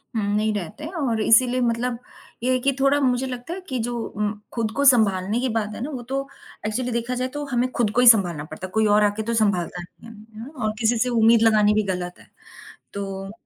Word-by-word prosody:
हुँ, 215 - 0
नहीं 215 0 +1
रहता 200 - -6
है 320 - -6
और 240 -8 -1
इसीलिए 250 +3 +4
मतलब 235 +1 -1 0.5
ये 255 - +1
है 255 - +1
कि 275 +3 +1
थोड़ा 275 +1 +3
मुझे 255 -1 +1
लगता 250 +6 -6
है 380 - -7
कि 255 - -2
जो 240 - -4
उम, 210 0 -3
खुद 225 -2 -2
को 280 - +1
सँभालने 215 -4 +3
की 255 0 -1
बात 215 -1 -2
है - - -7
ना 290 - -4
वो 255 -3 -5
तो 275 0 -2 0.4
एक्चुअली 245 +3 -2
देखा 235 +2 -2
जाए 255 +1 -1
तो 290 0 -4
हमें 245 +1 +1
खुद 230 -4 0
को 245 - +4
ही 250 - +5
सँभालना 180 -9 +5
पड़ता 180 +4 -8
है, - - -18
कोई 220 +1 +2
और 210 0 +4
आकर 205 +1 0
तो 230 +2 -2
सँभालता 190 -5 0
नहीं 175 +6 -14
है। 225 - -12 0.2
यू 230 - -7
नो 285 - -11
और 215 - 0
किसी 230 +1 +2
से 250 +3 +1
उम्मीद 230 -1 +4
लगानी 215 -2 +4
भी 215 0 +1
गलत 180 0 -6
है, - - -18 0.7
तो 195 -1 -5
230 Hz, 245 wpm, -23 LUFS, 210-250 Hz, 0.7 s, ही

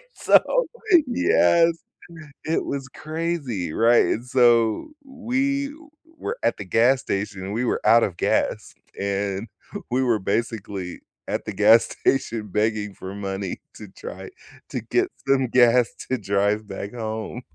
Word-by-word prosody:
So, - - +3 0.4
yes! 170 -9 +4 0.7
It 160 - 0
was 135 -2 -4
crazy, 155 - -3
right? 115 +1 +4
And 115 - -2
so 120 - +3 0.2
we 270 +2 -1 0.5
were 455 +10 -4
at - - +1
the 100 - -7
gas 120 +7 +3
station, 100 -1 -4
we 120 +3 -1
were - - 0
out 115 +1 +6
of 90 -4 -2
gas, - - 0 0.3
and 100 +1 -2 0.4
we 130 +1 +2
were 115 -4 +2
basically 100 -3 -3 0.3
at - - -3
the - - -4
gas 110 +2 +6 0.2
station 115 -5 +1
begging 105 0 -1
for 95 0 -8
money 95 -1 -4
to - - -10
try - - -9 0.4
to - - -4
get - - 0 0.2
some 135 -2 +3
gas 120 0 +4 0.2
to 130 - +1
drive 100 0 0
back 100 +1 -6
home. 110 +1 -5
115 Hz, 135 wpm, -23 LUFS, 100-135 Hz, 0.7 s, out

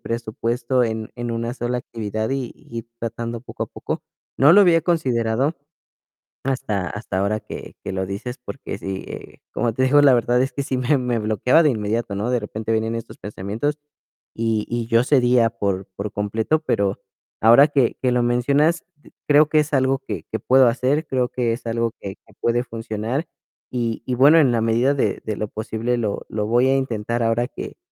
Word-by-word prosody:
presupuesto 120 +2 -1
en 110 -1 -3
en 120 -1 -3
una 115 +1 -2
sola 120 0 -2
actividad 110 -1 -4
y 135 -3 -2
y 115 0 -8 0.2
tratando 115 0 -4
poco - - -5
a - - -15
poco. - - -5 0.3
No 145 +4 +6
lo 205 - +8
había 175 -4 +5
considerado 130 -3 0 0.9
hasta 110 -9 -2
hasta 105 -3 -4
ahora 100 +2 0
que 105 - -9
que - - -4
lo 95 0 -2
dices, 110 +7 -5
porque 125 -7 -7
si, 95 0 -5
eh, - - -10
como 115 -1 0
te 130 - +1
digo, 145 +3 +5
la 140 -3 +6
verdad 120 +1 +2
es 130 - -1
que, 140 - -2
sí, 135 -1 -2
me 130 +3 +2
me 125 -2 -1
bloqueaba 110 - +3
de 155 - +4
inmediato, 110 -2 -2
¿no? 105 +5 -1
De 125 - +2
repente 110 +1 -5
venían 110 +1 0
estos 115 - -7
pensamientos 105 +9 -3 0.6
y 110 -2 0
y 120 -1 -2
yo 115 +1 +4
cedía 125 -4 +4
por 100 -3 -2
por 100 +2 -4
completo, 110 +9 0
pero 100 -11 0 0.4
ahora 120 +6 +7
que 140 -5 +1
que 125 - +2
lo 125 0 +2
mencionas, 140 +8 +2 0.4
creo 150 +1 +6
que 155 - +4
es 150 0 -1
algo 135 0 +2
que - - -4
que - - -2
puedo 130 0 +5
hacer, 130 +6 +1
creo 125 -2 0
que 120 -3 0
es 120 - -7
algo 115 0 0
que 95 -1 -6
que - - -25
puede 120 +1 +1
funcionar 115 +5 -4 0.4
y 120 -3 -2
y 125 - 0
bueno, 145 +6 +7
en 140 -5 +4
la 120 - +1
medida 115 +5 +2
de 140 - 0
de 110 - -2
lo 105 - -2
posible 110 +3 -2
lo 110 -4 -2
lo 105 -1 -2
voy 120 +3 +3
a 135 - +3
intentar 115 -3 -2
ahora 115 +1 +1
que - - -8
120 Hz, 195 wpm, -22 LUFS, 110-130 Hz, 0.9 s, lo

